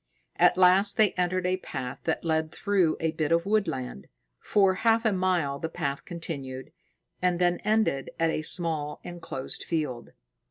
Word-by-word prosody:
At - - +4
last 185 +3 +5
they 215 -3 +5
entered 180 0 -1
a 185 +1 +1
path 125 -8 -6
that 160 +1 -1
led 160 -1 0
through 190 -6 +1
a 160 -1 0
bit 155 -1 -2
of 170 0 +2
woodland. 160 - -1 0.3
For 195 -2 +3
half 225 +3 +2
a 220 - +3
mile 180 -7 0
the 160 - -3
path 140 -3 -3
continued, 140 -5 -6 0.5
and 180 -1 +2
then 175 0 +2
ended 210 -11 +1
at 165 0 +2
a 155 - -2
small, 155 -3 -1
enclosed 165 -6 -6
field. 150 -8 -3
170 Hz, 160 wpm, -27 LUFS, 150-185 Hz, 0.5 s, last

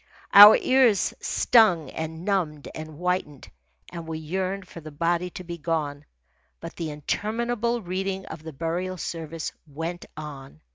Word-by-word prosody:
Our 205 +1 +11
ears 255 -6 +3
stung 185 - +3
and 160 +2 -6
numbed 165 -8 -1
and 155 -1 -8
whitened, 180 -5 -3 0.4
and 170 -2 -7
we 160 -1 -4
yearned 185 +4 -3
for 170 - -10
the 155 - -9
body 170 +4 -1
to 185 - -9
be 170 -1 -7
gone. 150 -3 -2 0.5
But 165 - -9
the 165 -2 -4
interminable 230 - -2
reading 190 +1 -3
of 160 - -9
the 160 0 -8
burial 170 +5 -3
service 165 -1 -5 0.2
went 165 +4 -6
on. 135 - -9
170 Hz, 145 wpm, -25 LUFS, 155-190 Hz, 0.5 s, Our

